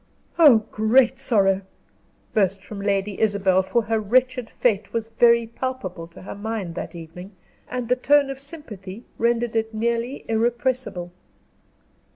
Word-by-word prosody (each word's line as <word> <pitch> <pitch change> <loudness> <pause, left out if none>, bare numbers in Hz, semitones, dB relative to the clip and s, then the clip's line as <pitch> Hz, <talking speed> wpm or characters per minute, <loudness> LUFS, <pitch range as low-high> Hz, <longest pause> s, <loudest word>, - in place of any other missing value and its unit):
"Oh, 250 -10 +7
great 230 +3 +3
sorrow!" 195 -4 +2 0.7
burst 195 -3 +1
from 200 0 -8
Lady 200 0 -1
Isabel, 195 -3 +3
for 235 +5 0
her 220 +1 0
wretched 250 +3 +1
fate 215 -5 0
was 225 -1 -2
very 235 0 +4
palpable 225 -8 -5
to 170 - -14
her - - -7
mind 205 -4 -4
that 175 - -6
evening, 170 +4 -10 0.4
and 250 -2 -3
the 250 - +3
tone 280 +2 +3
of 270 - -7
sympathy 235 - -9
rendered 235 0 +1
it 225 0 -1
nearly 235 +4 -2
irrepressible. 235 -5 -1
225 Hz, 140 wpm, -23 LUFS, 195-245 Hz, 0.7 s, Oh